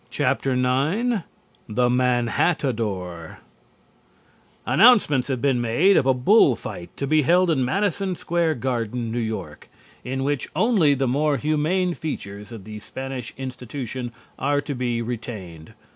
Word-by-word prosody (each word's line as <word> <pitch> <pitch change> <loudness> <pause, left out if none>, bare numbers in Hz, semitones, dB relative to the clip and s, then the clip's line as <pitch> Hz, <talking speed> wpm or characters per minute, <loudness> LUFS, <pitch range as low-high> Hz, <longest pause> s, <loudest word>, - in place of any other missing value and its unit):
IX - - +2 1.3
THE 125 +3 +2
MANHATTADOR 120 - 0 1.3
Announcements 200 - +5
have 130 -4 -2
been 130 -4 +2
made 140 +13 +3
of 135 - +3
a 130 - +5
bull 130 - +5
fight 85 - -8
to 140 - -2
be 155 +2 +3
held 175 +4 +3
in 135 -5 +1
Madison 195 +5 0
Square 170 -2 0
Garden, 120 -2 -2
New 120 - -2
York, 110 -1 -5 0.3
in 130 +1 -3
which 145 -1 -1
only 195 -11 +3
the 135 0 0
more 145 +3 +1
humane 155 +6 0
features 105 -10 -6
of 110 -4 -9
the 105 +1 -8
Spanish 130 +1 -6
institution 125 -1 -6 0.3
are 145 +1 +1
to 145 0 -4
be 120 -2 -2
retained. 110 -7 -7
130 Hz, 130 wpm, -23 LUFS, 115-150 Hz, 1.3 s, Announcements